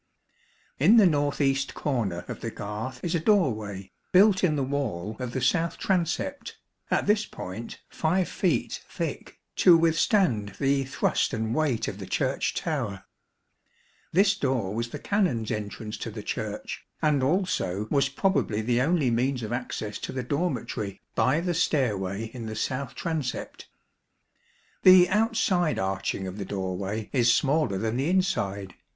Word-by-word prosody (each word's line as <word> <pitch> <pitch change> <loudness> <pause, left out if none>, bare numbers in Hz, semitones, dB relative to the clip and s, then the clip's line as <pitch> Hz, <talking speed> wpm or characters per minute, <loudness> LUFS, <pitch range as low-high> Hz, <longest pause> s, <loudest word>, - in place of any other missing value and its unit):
In 190 - +6
the 215 - +7
north 145 -4 +1
east 135 -1 +1
corner 110 - -2
of - - -7
the - - -3
garth 110 +5 -6
is 175 - -1
a 170 - +2
doorway, 110 - 0 0.2
built 195 +1 +5
in 160 -5 +3
the 140 - 0
wall 115 -8 -3
of 125 -2 -4
the 130 - -2
south 165 +6 +1
transept, 195 - -1 0.3
at - - +1
this 210 +1 +2
point 100 +6 -8
5 180 +3 0
feet 185 - -1
thick, - - -5 0.2
to 175 -3 +7
withstand 165 - +2
the 135 0 +1
thrust 130 - 0
and 110 +1 -2
weight 145 -6 0
of - - -5
the - - -7
Church - - -1
tower. - - -3 1.1
This 195 +4 +4
door 130 - -1
was 115 +1 -2
the - - -6
Canons' 175 - 0
entrance 105 +1 -5
to - - -5
the - - -7
Church, - - -4 0.2
and 150 -3 +2
also 135 - 0
was 140 -1 +3
probably 140 - 0
the 120 +2 +1
only 150 -3 +2
means 125 +1 0
of 110 +2 -3
access 115 -4 -4
to - - -5
the 130 -1 -3
dormitory 125 - -2
by 140 +6 +2
the 175 0 -1
stairway 110 - 0
in 120 -3 -6
the 110 - -5
south 130 +4 -3
transept. 160 -7 -4 1.1
The 185 -1 +8
outside 205 -6 +2
arching 95 0 -2
of 95 +2 -6
the 100 - -3
doorway 95 +2 -4
is 120 -3 +4
smaller 140 -6 +2
than 110 +4 -1
the 135 +5 0
inside. 100 - 0
130 Hz, 155 wpm, -27 LUFS, 110-170 Hz, 1.1 s, The